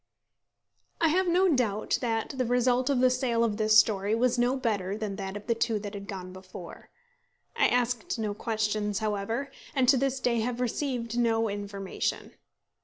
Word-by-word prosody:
I 325 Hz, -, +4 dB
have 370 Hz, +4 st, +2 dB
no 360 Hz, +2 st, +4 dB
doubt 240 Hz, -, +1 dB
that 225 Hz, -1 st, -1 dB
the 255 Hz, -1 st, 0 dB
result 250 Hz, +1 st, +2 dB
of 265 Hz, -3 st, +2 dB
the 255 Hz, 0 st, +5 dB
sale 250 Hz, -2 st, +1 dB
of 215 Hz, -3 st, 0 dB
this 215 Hz, -1 st, +4 dB
story 210 Hz, -1 st, +3 dB
was 245 Hz, +1 st, +1 dB
no 245 Hz, +2 st, +2 dB
better 205 Hz, -6 st, -1 dB
than 210 Hz, -3 st, -4 dB
that 195 Hz, 0 st, -4 dB
of 205 Hz, -, -11 dB
the 235 Hz, -, +2 dB
two 230 Hz, -1 st, 0 dB
that 205 Hz, 0 st, -6 dB
had 200 Hz, -1 st, -7 dB
gone 185 Hz, -2 st, -7 dB
before. 185 Hz, -2 st, -11 dB, 0.7 s
I 470 Hz, -, +4 dB
asked 245 Hz, -2 st, 0 dB
no 215 Hz, -2 st, -2 dB
questions, 210 Hz, -2 st, -1 dB
however, 220 Hz, +6 st, -2 dB, 0.2 s
and 260 Hz, -2 st, +3 dB
to 270 Hz, -, +6 dB
this 270 Hz, +1 st, 0 dB
day 240 Hz, -2 st, +1 dB
have 240 Hz, +2 st, -2 dB
received 245 Hz, -2 st, -2 dB
no 225 Hz, -1 st, +2 dB
information. 200 Hz, -1 st, -4 dB
230 Hz, 180 wpm, -28 LUFS, 205-250 Hz, 0.7 s, to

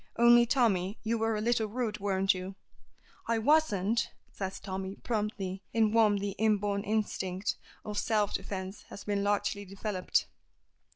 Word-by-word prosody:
Only, 240 Hz, 0 st, +7 dB
Tommy, 215 Hz, -6 st, +2 dB
you 225 Hz, +1 st, 0 dB
were 225 Hz, 0 st, +1 dB
a 210 Hz, -, -2 dB
little 225 Hz, -1 st, +1 dB
rude, 215 Hz, -1 st, -2 dB
weren't 195 Hz, -1 st, +2 dB
you?" 185 Hz, +1 st, -6 dB, 0.7 s
"I 230 Hz, -, +2 dB
wasn't," 230 Hz, -5 st, +2 dB, 0.2 s
says 190 Hz, -1 st, -4 dB
Tommy, 190 Hz, 0 st, -5 dB
promptly, 210 Hz, -4 st, -3 dB
in 220 Hz, -2 st, +3 dB
whom 215 Hz, -3 st, +5 dB
the 200 Hz, 0 st, -2 dB
inborn 205 Hz, -2 st, +2 dB
instinct 205 Hz, -2 st, -1 dB, 0.3 s
of 210 Hz, -1 st, -2 dB
self 210 Hz, -4 st, +1 dB
defence 190 Hz, 0 st, -4 dB
has 200 Hz, -, -9 dB
been 205 Hz, -1 st, -1 dB
largely 205 Hz, 0 st, 0 dB
developed. 195 Hz, -1 st, -1 dB
205 Hz, 140 wpm, -30 LUFS, 195-225 Hz, 0.7 s, Only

